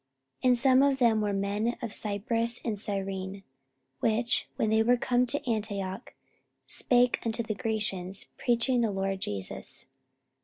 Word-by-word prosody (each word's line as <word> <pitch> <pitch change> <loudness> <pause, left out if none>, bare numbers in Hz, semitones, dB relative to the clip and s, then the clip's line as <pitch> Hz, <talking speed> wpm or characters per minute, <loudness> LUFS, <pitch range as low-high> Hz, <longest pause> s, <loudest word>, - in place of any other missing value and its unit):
44:011:020 255 - +3
And 250 - +5
some 260 +1 +5
of 280 -1 +3
them 230 -4 +3
were 205 -1 0
men 200 +4 -1
of 230 -3 -5
Cyprus 230 +3 -1
and 215 -4 -2
Cyrene, 195 -1 -4 0.6
which, 230 +2 +1
when 220 - 0
they 220 0 +4
were 245 +2 +4
come 245 +1 +1
to 285 +2 -1
Antioch, 205 -2 -3 0.5
spake 245 -1 +3
unto 230 0 -1
the 220 - -3
Grecians, 205 -4 -1
preaching 240 +1 +2
the 230 - +2
LORD 195 -1 -2
Jesus. 100 - -2
220 Hz, 150 wpm, -29 LUFS, 200-240 Hz, 0.6 s, And